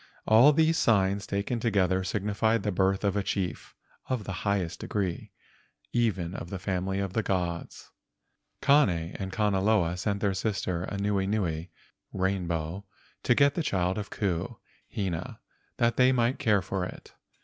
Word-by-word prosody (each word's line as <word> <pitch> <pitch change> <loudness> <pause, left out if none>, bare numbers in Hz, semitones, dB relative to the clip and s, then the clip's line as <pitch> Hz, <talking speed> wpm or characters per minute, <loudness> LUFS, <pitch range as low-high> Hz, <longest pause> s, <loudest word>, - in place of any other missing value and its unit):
All 115 +7 +7
these 160 +2 +3
signs 100 -4 +2
taken 100 +4 -2
together 95 -5 +1
signified 105 +3 0
the 105 - 0
birth 95 +1 +1
of 100 -1 +1
a 100 - +1
chief 95 -4 -3 0.3
of 130 -5 -1
the 100 - -5 0.2
highest 95 -3 -1
degree—even 95 +1 -3
of 85 - -6
the 95 - -4
family 95 0 -2
of 100 -2 -2
the 110 - +1
gods. 90 -4 -3 0.7
Kane 90 - +3
and 95 -1 -4
Kanaloa 100 -3 +2
sent 100 +2 -2
their 100 -1 +1
sister 95 -3 -2
Anuenue 100 -4 -1 0.5
(rainbow) 90 -2 -2 0.4
to 120 - +3
get 140 +1 +4
the 170 - -1
child 95 - 0
of 105 - -6
Ku 90 -5 -1
and - - -11 0.5
Hina 85 -3 -4 0.4
that 115 -1 +2
they 130 0 +5
might 120 +1 +1
care 105 -8 +2
for 95 0 -2
it. 90 - -8
100 Hz, 150 wpm, -28 LUFS, 95-110 Hz, 0.7 s, All